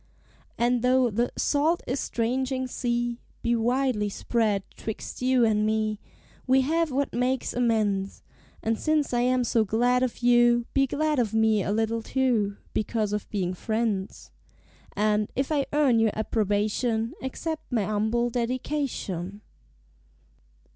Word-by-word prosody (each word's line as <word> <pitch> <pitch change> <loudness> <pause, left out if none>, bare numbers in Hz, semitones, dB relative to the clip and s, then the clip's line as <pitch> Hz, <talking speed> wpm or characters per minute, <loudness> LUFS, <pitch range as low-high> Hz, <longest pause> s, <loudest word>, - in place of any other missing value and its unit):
And, 240 0 +2
though 250 -1 +3
the 235 +4 0
"salt 310 +4 +1
estranging 260 +1 -1
sea" 240 -1 -2 0.2
Be 235 0 +2
widely 240 -2 +1
spread 210 -1 0
'twixt 220 +2 -6
you 255 -1 +3
and 215 -1 +2
me, 215 -1 0 0.5
We 260 +1 +5
have 325 +4 +1
what 275 +2 -1
makes 250 +1 0
amends; 215 -5 0 0.4
And 225 0 0
since 310 -4 +1
I 240 - +2
am 250 0 +2
so 230 -1 +2
glad 245 +4 +2
of 250 -1 -2
you, 240 -1 +4
Be 275 -1 +3
glad 300 +1 0
of 225 -3 0
me 220 -1 +3
a 195 - -2
little, 225 +1 0
too, 225 -6 0 0.2
Because 215 -1 -1
of 210 - -3
being 185 -3 -1
friends. 215 -1 -3 0.6
And, 210 0 +1
if 270 +3 -1
I 285 -3 +1
earn 280 -6 +3
your 225 -1 +2
approbation, 220 +2 0
Accept 315 +4 -5
my 230 -4 +1
humble 220 +3 0
dedication. 235 - -3
235 Hz, 135 wpm, -26 LUFS, 215-255 Hz, 0.6 s, We